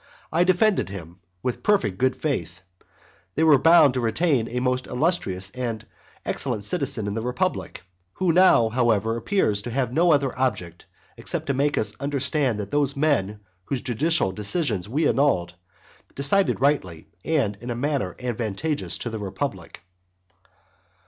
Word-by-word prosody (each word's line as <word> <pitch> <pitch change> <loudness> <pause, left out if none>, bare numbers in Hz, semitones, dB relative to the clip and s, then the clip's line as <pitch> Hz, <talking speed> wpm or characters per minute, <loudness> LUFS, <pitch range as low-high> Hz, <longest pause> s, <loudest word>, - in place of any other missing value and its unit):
I 170 +2 +4
defended 185 - +2
him 90 -2 -9 0.2
with 125 -2 -2
perfect 110 - +1
good 130 0 +2
faith, 95 - -3 0.7
they 160 - +2
were 150 -4 +6
bound 165 -3 +6
to 125 - -1
retain 120 +1 +1
a 125 +1 -3
most 125 0 -1
illustrious 125 - -1
and 120 -3 -4 0.4
excellent 120 -7 -2
citizen 130 - -3
in 100 - -2
the 115 - -2
republic, 125 - -2 0.3
who 180 -3 +1
now, 170 -11 +5
however, 115 -2 +1
appears 115 - 0
to 120 - -6
have 125 0 -1
no 170 +3 +4
other 140 -3 +2
object 95 -10 -2 0.3
except - - -4
to 140 - 0
make 145 +2 +1
us 105 -1 0
understand 140 -3 0
that 100 -1 -5
those 145 -1 +1
men 105 -9 0 0.2
whose 135 +1 -3
judicial 130 - +1
decisions 105 - -2
we 150 +5 +1
annulled, 90 -12 +1 0.6
decided 145 +7 +1
rightly 95 - 0 0.2
and 140 -11 0
in 120 +5 -8
a 120 - -2
manner 130 -7 -2
advantageous 125 +5 -2
to 120 - -5
the 110 - -4
republic. 95 - -5
125 Hz, 150 wpm, -24 LUFS, 105-145 Hz, 0.7 s, were